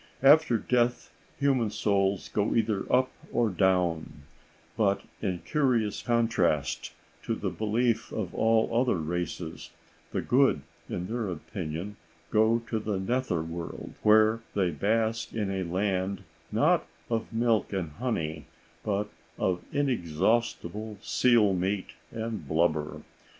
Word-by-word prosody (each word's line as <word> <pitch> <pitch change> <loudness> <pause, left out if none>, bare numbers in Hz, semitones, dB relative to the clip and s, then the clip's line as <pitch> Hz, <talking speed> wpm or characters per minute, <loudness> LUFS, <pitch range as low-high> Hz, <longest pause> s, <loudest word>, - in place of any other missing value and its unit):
After 145 -3 +6
death 120 +2 0 0.3
human 135 -6 +2
souls 100 -2 0
go 105 0 0
either 110 -3 0
up 130 +1 +3 0.2
or 115 -3 +2
down; 90 -6 +1 0.5
but 100 -2 +2 0.2
in 90 -5 -2
curious 120 -8 +1
contrast 115 - +1 0.3
to - - -2
the - - -3
belief 115 +1 0
of 95 -5 -3
all 110 0 +2
other 125 -4 +2
races, 85 0 -4 0.4
the - - -2
good, 135 +2 +3 0.3
in 90 - -3
their 115 0 -2
opinion, 90 +2 -5 0.3
go 110 +2 +3
to 110 - -1
the 105 -2 -2
nether 95 -5 0
world, 85 +1 -6
where 110 +1 +5 0.2
they 95 -4 +2
bask 110 +7 0
in 105 -3 -1
a 95 -1 -1
land, 95 +2 -1 0.3
not - - +3 0.2
of 115 -1 -2
milk 115 -1 +1
and 90 -6 -2
honey, 80 - -3 0.4
but 105 0 0 0.3
of 90 -2 0
inexhaustible 110 - 0
seal 115 -6 +4
meat 95 +2 -1 0.2
and 110 -8 -4
blubber. 80 -1 0
105 Hz, 125 wpm, -28 LUFS, 90-115 Hz, 0.5 s, After